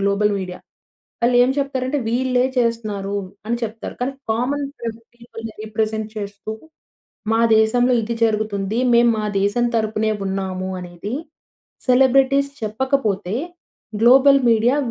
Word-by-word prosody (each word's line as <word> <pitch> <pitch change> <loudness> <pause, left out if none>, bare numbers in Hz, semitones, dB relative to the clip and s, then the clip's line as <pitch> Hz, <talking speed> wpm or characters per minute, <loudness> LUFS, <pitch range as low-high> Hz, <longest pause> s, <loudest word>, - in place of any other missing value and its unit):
Global 200 +1 +2
media. 180 -1 -6 0.6
వాళ్ళేం 245 +1 +4
చెప్తారంటే 275 0 -1
వీళ్ళే 250 +1 +1
చేస్తున్నారు 215 -4 -1 0.3
అని 235 +2 0
చెప్తారు. 225 0 -6
కానీ 255 +2 -1 0.2
కామన్ 265 +6 0 0.5
పీపుల్‌ని 225 -2 -9
రిప్రజెంట్ 220 0 -2
చేస్తూ, 205 +1 -5 0.8
"మా 225 - +3 0.2
దేశంలో 245 +3 +3
ఇది 230 +2 -3
జరుగుతుంది 215 -1 -1 0.2
మేం 235 0 +5
మా 215 - -1
దేశం 205 +5 +1
తరపునే 215 0 0
ఉన్నామూ" 190 -1 -3
అనేది, 180 +5 -6 0.7
సెలబ్రిటీస్ 270 +2 +4
చెప్పకపోతే 215 -4 -1 0.7
గ్లోబల్ 270 +3 +7
మీడియా 230 +4 +3
225 Hz, 110 wpm, -20 LUFS, 210-250 Hz, 0.8 s, గ్లోబల్